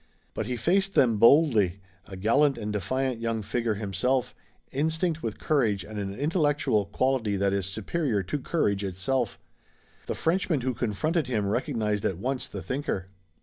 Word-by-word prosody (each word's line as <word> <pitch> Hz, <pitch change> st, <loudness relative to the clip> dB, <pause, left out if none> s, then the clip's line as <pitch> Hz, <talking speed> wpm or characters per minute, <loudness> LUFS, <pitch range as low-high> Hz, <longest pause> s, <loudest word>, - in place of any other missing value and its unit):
But 110 Hz, -, -3 dB
he 125 Hz, -, -1 dB
faced 190 Hz, -, +1 dB
them 115 Hz, -5 st, +4 dB
boldly, 115 Hz, -, +5 dB, 0.3 s
a 95 Hz, -, -8 dB
gallant 135 Hz, +8 st, +3 dB
and 105 Hz, 0 st, -4 dB
defiant 130 Hz, +4 st, -1 dB
young 115 Hz, -2 st, -1 dB
figure 115 Hz, +1 st, -1 dB
himself, 110 Hz, +6 st, -1 dB, 0.4 s
instinct 160 Hz, +3 st, 0 dB
with 110 Hz, -3 st, -4 dB
courage 115 Hz, -11 st, +1 dB
and 105 Hz, +3 st, -7 dB
an 100 Hz, -1 st, -4 dB
intellectual 145 Hz, -, +1 dB
quality 115 Hz, -1 st, 0 dB
that 100 Hz, 0 st, +1 dB
is 100 Hz, -2 st, 0 dB
superior 110 Hz, -, -1 dB
to 120 Hz, +12 st, -3 dB
courage 105 Hz, -9 st, 0 dB
itself. 100 Hz, +5 st, -1 dB, 0.7 s
The -, -, -2 dB
Frenchman 165 Hz, -3 st, +1 dB
who 130 Hz, +1 st, -1 dB
confronted 130 Hz, -, -1 dB
him 110 Hz, -5 st, 0 dB
recognized 105 Hz, 0 st, -1 dB
at 95 Hz, -, 0 dB
once 130 Hz, +6 st, -2 dB
the -, -, -7 dB
thinker. 130 Hz, -9 st, -3 dB
115 Hz, 155 wpm, -27 LUFS, 100-140 Hz, 0.7 s, boldly